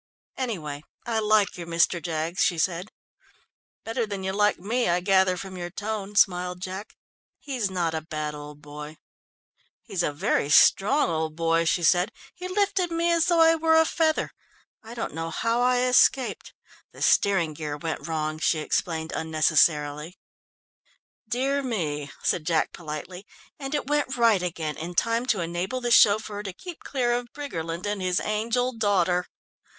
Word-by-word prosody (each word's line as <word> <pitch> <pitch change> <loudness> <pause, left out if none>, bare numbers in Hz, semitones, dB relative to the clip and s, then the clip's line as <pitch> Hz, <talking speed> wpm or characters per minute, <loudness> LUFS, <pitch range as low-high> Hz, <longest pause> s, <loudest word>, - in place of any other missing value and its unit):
"Anyway, 155 - -4 0.2
I 230 -2 0
like 215 -3 +2
your 170 - -6
Mr. 170 +1 +2
Jaggs," 165 +1 -2
she 175 - +2
said. 180 +4 -1 0.9
"Better 225 0 -2
than 200 -2 -5
you 190 0 -2
like 210 +1 +2
me, 225 +5 -1
I 175 +1 +2
gather 190 0 +3
from 190 0 -7
your 175 -1 -5
tone," 205 +1 -5
smiled 180 -2 +2
Jack. 190 +3 -7 0.4
"He's 250 -8 -3
not 175 -3 -1
a 160 - -2
bad 155 -1 -4
old 150 0 -10
boy." 150 +1 -9 0.9
"He 215 - -13
is 180 - +1
a 150 - 0
very 145 0 0
strong 200 - +5
old 160 -1 -2
boy," 165 0 +1
she 175 +1 +1
said. 180 +5 +3 0.2
"He 360 0 -7
lifted 385 -1 +1
me 335 +1 +1
as 335 -1 +2
though 340 -2 +4
I 325 0 +7
were 320 0 +2
a 320 0 +6
feather 315 -1 0 0.5
I 230 0 -11
don't 230 - -4
know 165 +1 -4
now - - -4
how 230 +7 0
I 250 0 +3
escaped. 255 +1 +2 0.4
The - - -6
steering 180 -6 +3
gear 150 -1 -5
went 160 -1 -4
wrong," 155 -1 -2
she 160 - +2
explained 160 +1 -2
unnecessarily. 155 0 +1 1.1
"Dear 270 +5 0
me," 155 - -3
said 155 - 0
Jack 165 -2 +1
politely, 170 +4 -7 0.3
"and 275 +1 -3
it 290 - -2
went 290 -2 0
right 230 -5 +4
again 165 -4 -3
in 170 +3 -6
time 230 +4 +1
to 205 -8 +1
enable 175 +8 -3
the 240 -1 -2
chauffeur 210 -1 +4
to 195 -3 -6
keep 345 - -10
clear 245 -3 0
of 240 0 -3
Briggerland 170 - -5
and 205 -1 -2
his 185 0 +1
angel 235 +4 -1
daughter!" 185 -5 +1
190 Hz, 170 wpm, -25 LUFS, 165-240 Hz, 1.1 s, I